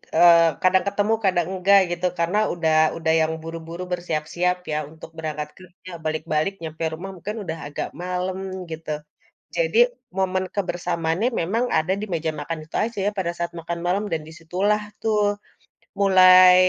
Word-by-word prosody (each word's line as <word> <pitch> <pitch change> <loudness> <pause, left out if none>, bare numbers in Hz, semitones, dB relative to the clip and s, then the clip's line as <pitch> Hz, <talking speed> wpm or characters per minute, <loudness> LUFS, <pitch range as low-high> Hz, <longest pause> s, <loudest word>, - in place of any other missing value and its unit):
eee, 170 0 +7 0.2
kadang 185 0 +4
ketemu 205 +2 +1
kadang 175 -3 +2
enggak 195 +2 +5
gitu, 175 +1 -2
karena 170 +5 +1 0.2
udah 160 -2 +1 0.2
udah 160 -1 +1
yang 160 0 +1
buru-buru 165 +1 -7
bersiap-siap 175 +1 -1
ya 150 - 0
untuk 160 - -12
berangkat 150 -1 -4
kerja. 185 0 -14 0.2
Balik-balik 155 +3 0
nyampe 160 0 -5
rumah 185 +5 -6
mungkin 210 +6 -5
udah 165 -2 -4
agak 145 - -4
malam, 180 +1 -2 0.3
gitu. 160 0 -7 0.7
Jadi - - +1 0.4
momen 190 0 +1
kebersamaannya 175 +1 -1
memang 220 +9 0
ada 170 +4 +1
di - - -2
meja 160 -1 -1
makan 155 +2 -4
itu 155 - -11
aja 230 -1 -4
ya, - - +3
pada 175 -3 0
saat 170 0 -2
makan 170 +1 -4
malam 195 +4 +1
dan 160 -1 -1
di - - -10
situlah 195 +6 0 0.2
tuh 215 -1 +1 0.8
mulai, 185 -1 +8
175 Hz, 160 wpm, -23 LUFS, 160-190 Hz, 0.8 s, mulai